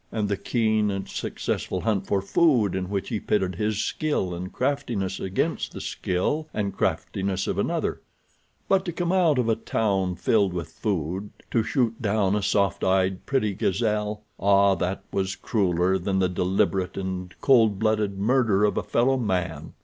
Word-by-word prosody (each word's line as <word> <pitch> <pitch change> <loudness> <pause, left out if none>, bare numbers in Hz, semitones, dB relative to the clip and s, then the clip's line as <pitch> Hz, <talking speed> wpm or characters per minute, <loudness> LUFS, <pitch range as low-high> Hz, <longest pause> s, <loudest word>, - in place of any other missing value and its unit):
And 105 -2 -1
the 100 - +1
keen 110 0 +1
and 95 -1 -3
successful 90 - -3
hunt 105 -4 0
for 100 -1 +1
food 120 - +3
in 95 -1 -3
which 100 -1 -2
he 110 -4 -1
pitted 95 -3 0
his 105 +3 -1
skill 145 -13 -1
and 90 +2 -5
craftiness 120 -8 -1
against 95 0 -2
the - - -6
skill 145 - -1
and 100 -2 -2
craftiness 95 -1 -1
of - - -2
another; - - -1 0.7
but 190 -1 +3
to 175 - -2
come 175 +1 -1
out 175 -6 +3
of 125 -2 +1
a 115 - +3
town 95 -6 0
filled 100 -1 +2
with 85 -2 -4
food 95 +1 -2 0.2
to 115 - +3
shoot 115 0 0
down 105 -2 +1
a 105 - 0
soft 100 -2 +1
eyed, 95 0 +1
pretty 125 -7 +1
gazelle—ah, 105 -1 +1
that 95 +1 -2
was 95 -1 -1
crueller 95 -3 +1
than 95 +2 -1
the 95 -1 +3
deliberate 90 0 0
and 95 -2 -4
cold 115 -7 +4
blooded 110 -2 0
murder 105 -2 +3
of 105 - 0
a - - 0
fellow 130 +3 +2
man. 90 -8 -2
100 Hz, 165 wpm, -25 LUFS, 95-110 Hz, 0.7 s, cold